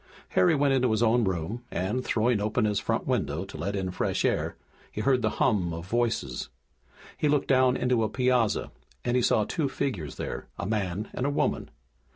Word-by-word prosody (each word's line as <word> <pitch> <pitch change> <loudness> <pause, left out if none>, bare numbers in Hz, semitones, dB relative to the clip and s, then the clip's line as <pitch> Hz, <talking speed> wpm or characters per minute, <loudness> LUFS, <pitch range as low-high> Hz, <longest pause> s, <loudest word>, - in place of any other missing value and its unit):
Harry 90 - +4
went 140 -1 +3
into 130 -2 +3
his 110 +1 +2
own 120 +1 +4
room, 95 +5 -2
and, 105 +8 -2
throwing 115 -2 +1
open 110 +2 +1
his 105 -1 +1
front - - -1
window 80 +6 -1
to - - -11
let 100 +1 -3
in 95 -2 -2
fresh 90 - -1
air, - - 0 0.3
he 105 - -4
heard 130 +2 +3
the - - +2
hum 95 -8 +2
of 85 +1 -7
voices. 115 - -1 0.7
He 150 - +1
looked 145 -1 +2
down 130 -1 +4
into 125 -2 +1
a 110 - 0
piazza 125 -4 +1 0.3
and 120 - +1
he 125 - +3
saw 110 - +3
two 145 - -1
figures 95 - -3
there, - - -5
a 100 - -3
man 100 -1 -2
and 130 - -1
a - - +2
woman. 145 - 0
110 Hz, 200 wpm, -27 LUFS, 100-125 Hz, 0.7 s, Harry